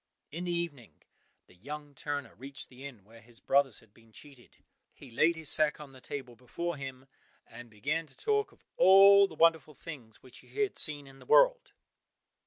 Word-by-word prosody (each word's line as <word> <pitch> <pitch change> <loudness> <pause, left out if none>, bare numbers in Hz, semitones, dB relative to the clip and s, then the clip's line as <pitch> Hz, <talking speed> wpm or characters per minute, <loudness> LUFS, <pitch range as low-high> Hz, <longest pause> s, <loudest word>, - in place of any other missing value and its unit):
In 170 +4 -6
the 175 - -2
evening 165 -9 -5 0.4
the - - -22
young 145 +9 -9
turner 145 +1 -5
reached 135 +2 -7
the 130 +2 -10
inn 120 -8 -14
where 115 +3 -18
his 115 +1 -18
brothers 135 -4 +1
had 110 -2 -25
been 115 0 -23
cheated. 135 0 -16 0.4
He 130 - -14
laid 160 +8 +2
his 160 -1 -5
sack 155 -1 +3
on 145 -2 -11
the 130 -1 -16
table 130 -4 -7
before 170 +8 -5
him, 135 -2 -9 0.4
and 120 +1 -13
began 150 +10 -3
to 135 - -19
talk 425 0 -1
of - - -26
all 195 +1 +7
the 165 - -13
wonderful 160 -2 +2
things 130 -10 -11
which 130 - -16
he - - -20 0.2
had 405 - -3
seen 145 -2 +2
in 135 0 -16
the - - -17
world. - - +4
140 Hz, 190 wpm, -30 LUFS, 125-165 Hz, 0.4 s, all